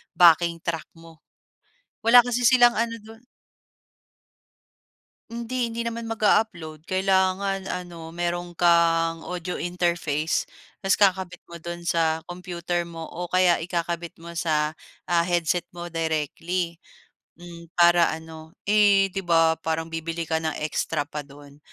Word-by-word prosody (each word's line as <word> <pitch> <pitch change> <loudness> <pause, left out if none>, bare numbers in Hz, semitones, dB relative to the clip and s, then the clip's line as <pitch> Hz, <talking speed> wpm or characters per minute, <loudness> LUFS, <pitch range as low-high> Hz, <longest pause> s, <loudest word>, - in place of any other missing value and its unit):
backing 170 -1 +5
track 165 -2 -3
mo 165 -1 -15 0.9
wala 245 +2 +9
kasi 245 0 -1
silang 240 -1 +6
ano 230 0 -1
dun. 225 +3 -15 2.0
Hindi. 235 +1 -3
Hindi 230 - -3
naman 230 0 -4
mag 225 0 -5
a-upload 170 -8 +1
kailangan 190 +1 +1
ano 170 -3 -6
meron 175 0 -3
kang 165 -1 +2
audio 180 0 -4
interface. 170 -3 -1 0.3
Tas 195 -1 +1
kakabit 190 -3 +1
mo 170 - -8
dun 170 +1 -7
sa 165 -2 +1
computer 175 -1 -3
mo 165 -1 -8
o 180 - -5
kaya 180 0 +3
ikakabit 170 0 -3
mo 170 0 -9
sa, 155 -1 0 0.3
ah, 170 -1 +3
headset 175 0 0
mo 175 0 -7
directly, 165 +2 -2 0.6
hmm, 170 -1 -12
para 175 -1 +5
ano, 160 0 -12
eh, 200 -2 +4
di 195 - -3
ba 165 -3 +3
parang 160 0 -3
bibili 165 +1 -3
ka 160 0 -1
ng 160 -1 -3
extra 155 0 -1
pa 150 +1 -7
dun 145 0 -15
175 Hz, 135 wpm, -24 LUFS, 165-190 Hz, 2.0 s, wala